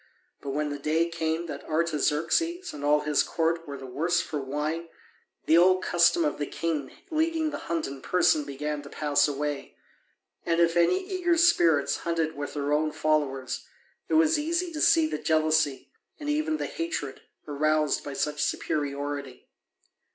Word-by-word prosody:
But 140 - -6
when 150 +2 -1
the 145 0 -5
day 160 +4 +1
came 165 0 -1
that 145 -4 -7
Artaxerxes 165 - 0
and 145 - -8
all 150 +1 +3
his 150 -1 +2
court 165 0 -1
were 140 -1 -6
the 135 - -9
worse 165 +7 0
for 150 -4 -3
wine, 150 +5 -3 0.6
the 165 +2 +5
old 185 +1 +4
custom 175 - +3
of 300 - -2
the 145 - -2
king 155 -5 -3 0.2
leading 320 0 0
the 290 - -5
hunt 170 -1 0
in 135 -1 -7
person 180 -4 +2
began 145 +1 -4
to 140 - -11
pass 145 0 +2
away. 145 0 -4 0.7
And 165 0 0
if 170 0 +3
any 270 - +3
eager 360 -3 +1
spirits 170 - +4
hunted 165 -2 -2
with 145 +1 -6
their 145 0 -1
own 155 +1 +1
followers 150 -4 -1 0.5
it - - +2
was 315 -1 +4
easy 335 +3 -1
to 310 -1 -4
see 325 -1 +5
the 310 - -3
jealousy, 155 -3 +1 0.3
and 295 - -7
even 310 +1 0
the - - -3
hatred, 320 - -4 0.3
aroused 155 0 +1
by 145 - -6
such 150 +1 -2
superiority. 140 -3 -3
155 Hz, 165 wpm, -27 LUFS, 145-180 Hz, 0.7 s, the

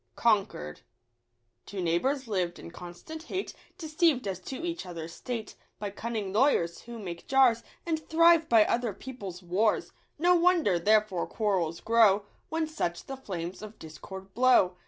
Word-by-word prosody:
Contort) 195 - 0 0.9
Two 200 - -6
neighbours 240 - 0
lived 180 -5 -1
in - - -10
constant 175 - -9
hate, 375 +3 -4 0.2
Deceived 310 - +1
as 190 -2 -3
to 265 - -6
each 340 0 -3
other's 170 -2 -7
state 235 -3 -5 0.2
By 205 -1 -4
cunning 215 -2 -4
lawyers, 210 -8 +2
who 235 0 -9
make 180 -6 -7
jars, 260 -4 +4 0.2
And 325 -2 0
thrive 330 0 +5
by 225 -2 +6
other 235 -3 0
people's 200 -9 -8
wars; 195 +5 +1 0.3
No 350 +4 +4
wonder 340 - +3
therefore 210 -1 +2
quarrels 185 -7 -1
grow, 215 -3 +4 0.2
When 320 0 0
such 175 - -3
the 270 - -6
flames 185 -9 -6
of 215 0 -9
discord 190 +5 -10
blow. 245 -7 +4
215 Hz, 150 wpm, -29 LUFS, 180-270 Hz, 0.9 s, by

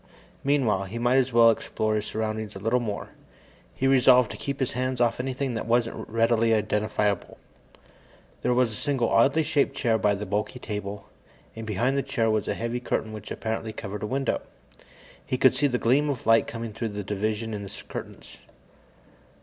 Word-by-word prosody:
Meanwhile, 125 -9 +2
he 100 +5 -6
might 120 +2 +2
as 130 -1 +2
well 115 -1 +7
explore 110 -1 -2
his 105 -1 -1
surroundings 110 -1 -3
a - - -6
little 115 +5 +1
more. 105 -4 -4 0.7
He 135 - -1
resolved 125 -2 +5
to - - -6
keep 140 0 -4
his 130 - 0
hands 130 0 -2
off 120 -1 +2
anything 130 0 -2
that 115 - -4
wasn't 115 0 0
readily 115 0 +3
identifiable. 105 -1 -1 1.0
There 125 - +1
was 125 -2 +3
a - - -6
single 130 -1 0
oddly 140 +7 +4
shaped 145 -2 +1
chair 115 -2 +2
by 105 -1 +2
the 105 +1 -5
bulky 105 +5 -2
table, 105 -3 -5 0.5
and 115 -1 -7
behind 120 +7 0
the - - +2
chair 115 -5 0
was 110 -2 0
a - - -1
heavy 115 +2 -2
curtain 110 -2 -2
which 105 -1 -8
apparently 110 0 -3
covered 105 -1 -6
a 105 - -2
window. 135 +3 -1 0.8
He 130 - -2
could 130 0 +5
see 140 +3 +2
a 125 -3 0
gleam 135 +6 +2
of 135 -5 -3
light 115 0 +4
coming 115 -1 -5
through 110 +1 -3
the 105 0 -5
division 105 +3 -2
in 105 - -4
the 100 - -8
curtains. - - -8
115 Hz, 190 wpm, -26 LUFS, 105-125 Hz, 1.0 s, well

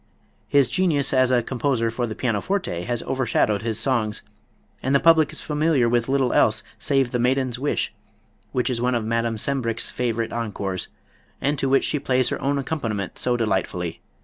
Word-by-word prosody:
His 140 -3 +4
genius 145 -1 +1
as 130 -1 +4
a 120 -2 +3
composer 120 -2 0
for 120 +1 -2
the 110 - -5
pianoforte 115 - -1
has 120 -1 -2
overshadowed 115 -5 +1
his 115 -1 0
songs, 115 -4 0 0.6
and 135 +2 +1
the - - +6
public 160 -2 +5
is - - -5
familiar 150 -4 +1
with 120 +1 +1
little 135 -2 +2
else 110 0 +3 0.2
save 135 -3 +1
"The 125 - -1
Maiden's 125 0 +1
Wish," 145 +2 -1 0.6
which 125 +1 0
is 120 -1 -2
one 125 0 +1
of 115 -2 -1
Madame 115 0 0
Sembrich's 115 -2 -1
favorite 115 -2 -2
encores 100 -5 -3 0.5
and 145 0 0
to 135 - 0
which 135 - +4
she 150 - 0
plays 130 -2 +2
her - - -3
own 140 +1 0
accompaniment 115 - -3
so 125 -1 +1
delightfully. 95 -6 -2
125 Hz, 175 wpm, -23 LUFS, 115-135 Hz, 0.6 s, the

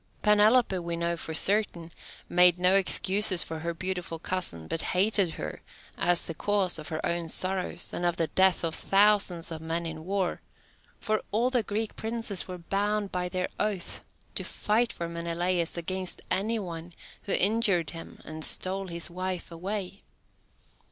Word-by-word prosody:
Penelope, 210 -1 +5
we 170 -1 -3
know 170 0 -1
for 160 -1 -5
certain, 185 -3 +2 0.4
made 180 0 +5
no 180 +1 +4
excuses 195 0 +4
for 160 -1 -6
her 170 +2 -2
beautiful 180 -1 -4
cousin, 160 - -2
but 165 - 0
hated 190 -3 +2
her - - -6 0.3
as 175 0 +2
the 165 - -4
cause 190 -1 +1
of 150 - -7
her 160 -1 -3
own 170 -1 -1
sorrows 185 0 -2
and - - -3
of 175 -1 +1
the 165 - +2
deaths 190 +4 +3
of 165 -1 -1
thousands 195 -3 +2
of 160 -1 -5
men 165 +1 -2
in 160 -1 -6
war, 190 0 -1 0.6
for 215 -1 0
all 235 +4 +1
the 250 -2 +2
Greek 215 +1 -3
princes 225 -3 0
were 185 -1 -6
bound 200 +3 -1
by 180 0 -1
their 180 0 -1
oath 205 -4 -2 0.3
to - - -3
fight 230 +3 +1
for 170 - -5
Menelaus 170 +1 -1
against 185 +2 -4
any 210 +5 +1
one 170 -4 -6 0.3
who 200 - -1
injured 195 -5 +2
him 165 -1 -9
and 155 0 -6
stole 190 +3 +1
his 170 -1 -3
wife 185 0 -3
away. 195 +3 -4
180 Hz, 165 wpm, -28 LUFS, 170-200 Hz, 0.6 s, Penelope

